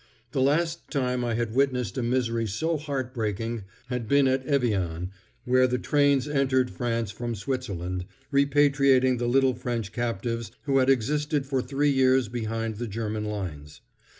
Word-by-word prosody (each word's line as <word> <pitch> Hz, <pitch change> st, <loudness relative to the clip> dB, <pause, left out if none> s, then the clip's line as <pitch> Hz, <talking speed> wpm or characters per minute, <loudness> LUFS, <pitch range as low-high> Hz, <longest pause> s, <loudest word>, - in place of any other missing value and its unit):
The 135 Hz, -, 0 dB
last 165 Hz, +5 st, +1 dB
time 125 Hz, -3 st, 0 dB
I 120 Hz, -2 st, -1 dB
had 115 Hz, -1 st, -2 dB
witnessed 125 Hz, -6 st, +1 dB
a 130 Hz, -, -1 dB
misery 115 Hz, -2 st, 0 dB
so 160 Hz, -, -1 dB
heart 140 Hz, -4 st, -3 dB
breaking 115 Hz, -1 st, -3 dB, 0.2 s
had 125 Hz, -3 st, -4 dB
been 140 Hz, +2 st, +4 dB
at 130 Hz, 0 st, +1 dB
Evian, 95 Hz, -, 0 dB, 0.3 s
where 130 Hz, +1 st, +4 dB
the 125 Hz, 0 st, 0 dB
trains 140 Hz, 0 st, +2 dB
entered 130 Hz, -3 st, +1 dB
France 115 Hz, -3 st, -2 dB
from 120 Hz, +2 st, -4 dB
Switzerland, 95 Hz, -7 st, -3 dB, 0.3 s
repatriating 140 Hz, -2 st, +4 dB
the 120 Hz, -, 0 dB
little 135 Hz, +1 st, +4 dB
French 120 Hz, -4 st, -3 dB
captives 115 Hz, -1 st, -3 dB
who 135 Hz, -2 st, +2 dB
had 130 Hz, 0 st, +3 dB
existed 145 Hz, +3 st, +1 dB
for 135 Hz, -1 st, 0 dB
three 140 Hz, +3 st, +1 dB
years 130 Hz, -3 st, +3 dB
behind 115 Hz, -2 st, -3 dB
the 120 Hz, +1 st, -4 dB
German 110 Hz, 0 st, -3 dB
lines. 85 Hz, -9 st, -6 dB
125 Hz, 155 wpm, -26 LUFS, 115-135 Hz, 0.3 s, been